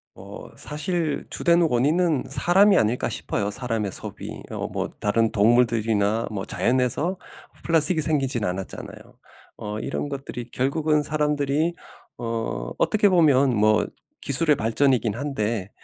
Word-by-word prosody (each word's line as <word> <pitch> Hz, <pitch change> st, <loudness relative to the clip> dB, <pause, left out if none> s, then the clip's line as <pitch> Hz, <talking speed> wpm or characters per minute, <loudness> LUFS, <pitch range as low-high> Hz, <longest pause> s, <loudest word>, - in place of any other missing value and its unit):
어 -, -, -11 dB
사실 155 Hz, 0 st, -3 dB
주된 170 Hz, 0 st, +2 dB
원인은 155 Hz, +2 st, +2 dB
사람이 190 Hz, +8 st, +4 dB
아닐까 115 Hz, +3 st, +1 dB
싶어요, 100 Hz, 0 st, -3 dB
사람의 110 Hz, -3 st, -3 dB
소비. -, -, -6 dB
어 -, -, -4 dB
뭐 -, -, -4 dB
다른 110 Hz, +2 st, +1 dB
동물들이나 110 Hz, -1 st, +2 dB
뭐 100 Hz, -2 st, -4 dB
자연에서 130 Hz, +9 st, 0 dB, 0.5 s
플라스틱이 160 Hz, 0 st, +3 dB
생기진 135 Hz, -7 st, 0 dB
않았잖아요. 90 Hz, +1 st, -5 dB, 0.6 s
어 105 Hz, +1 st, -5 dB
이런 145 Hz, -, -4 dB
것들이 130 Hz, -3 st, -7 dB
결국은 150 Hz, +3 st, +1 dB
사람들이 150 Hz, +2 st, 0 dB, 0.4 s
어 115 Hz, -, -4 dB
어떻게 210 Hz, -1 st, +3 dB
보면 140 Hz, -8 st, +4 dB
뭐 105 Hz, 0 st, +3 dB, 0.4 s
기술의 150 Hz, +2 st, +5 dB
발전이긴 115 Hz, -1 st, +1 dB
한데 115 Hz, -7 st, -3 dB
130 Hz, 295 characters per minute, -23 LUFS, 110-155 Hz, 0.6 s, 기술의